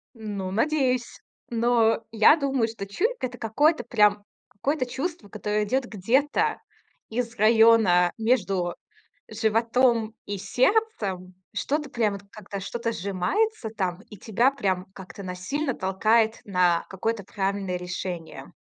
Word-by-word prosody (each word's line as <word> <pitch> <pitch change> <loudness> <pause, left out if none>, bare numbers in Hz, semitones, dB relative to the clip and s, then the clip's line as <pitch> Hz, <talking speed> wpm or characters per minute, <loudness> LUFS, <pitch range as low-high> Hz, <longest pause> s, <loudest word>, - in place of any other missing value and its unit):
Ну, 205 -4 -5
надеюсь. 255 +1 0 0.3
Но 230 -1 +2
я 220 +7 +6
думаю, 270 -6 0
что 220 -3 -6
чуйка- 440 - -1
это 245 0 -12
какое-то 295 +9 +2
прям, 210 -3 +3 0.3
какое-то 270 +5 -1
чувство, 270 - -5
которое 210 +1 -1
идёт 255 +4 0
где-то 240 +8 +1 0.5
из 230 0 -3
района 220 -5 +5
между 195 -7 0 0.5
животом 225 +1 +1
и 200 -1 -4
сердцем, 215 - 0 0.2
что-то 290 +7 -2
прямо 215 -5 0
как-то, 200 -2 -7
что-то 230 +3 -3
сжимается 220 - -1
там, 185 -4 -3
и 210 - -10
тебя 230 +6 +2
прям 190 -8 -1
как-то 190 +1 -10
насильно 200 +11 -3
толкает 220 +4 +2
на 180 -3 +2
какое-то 200 +2 -3
правильное 195 -1 -2
решение, 180 -1 -6
220 Hz, 120 wpm, -25 LUFS, 195-250 Hz, 0.5 s, я